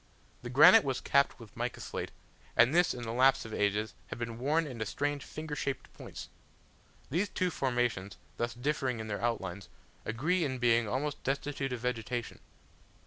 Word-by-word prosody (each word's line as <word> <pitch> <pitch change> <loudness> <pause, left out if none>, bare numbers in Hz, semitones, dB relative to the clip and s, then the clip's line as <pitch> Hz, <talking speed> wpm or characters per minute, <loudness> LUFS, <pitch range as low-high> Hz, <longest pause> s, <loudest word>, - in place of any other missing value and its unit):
The 120 - -6
granite 130 +4 +8
was 135 -2 -1
capped 140 -1 +2
with 110 -3 -13
mica 120 +1 -3
slate, - - -4 0.5
and 125 +5 +6
this 175 +1 +4
in 120 - -6
the 115 - -3
lapse 130 +1 +4
of 110 - -7
ages 105 +1 0
had - - -6
been 115 -1 -5
worn 155 +6 +2
into 125 -6 -4
strange 145 +6 -2
finger 155 -1 -6
shaped 140 -2 -3
points. - - -9 0.8
These 185 +7 +1
two 180 -1 0
formations, 120 - -1 0.2
thus 120 -1 -2
differing 130 -2 -1
in 110 - -4
their 100 - -3
outlines, 100 -5 -2 0.3
agree 160 +11 0
in 130 -4 -1
being 120 -2 +3
almost 140 +6 -2
destitute 140 0 -2
of 125 -2 -3
vegetation. 120 -1 -3
125 Hz, 170 wpm, -31 LUFS, 115-140 Hz, 0.8 s, granite